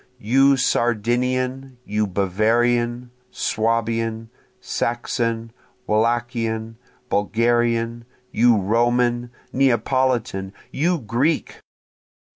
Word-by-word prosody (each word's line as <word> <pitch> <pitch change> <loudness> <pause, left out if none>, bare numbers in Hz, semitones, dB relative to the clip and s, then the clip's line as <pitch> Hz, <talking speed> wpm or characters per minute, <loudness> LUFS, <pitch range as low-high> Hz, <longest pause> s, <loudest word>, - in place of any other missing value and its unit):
You 135 +4 +3
Sardinian! 125 +2 0
you 105 0 0
Bavarian! 120 +6 +1 0.2
Swabian! 115 0 -1 0.3
Saxon! 115 -1 -2 0.3
Wallachian! 115 0 -1 0.3
Bulgarian! 115 +2 +1 0.3
You 120 0 +4
Roman! 120 +3 +1 0.2
Neapolitan! 125 -5 +1 0.2
you 170 +5 +1
Greek! 130 +5 -1
120 Hz, 65 wpm, -22 LUFS, 115-125 Hz, 0.3 s, You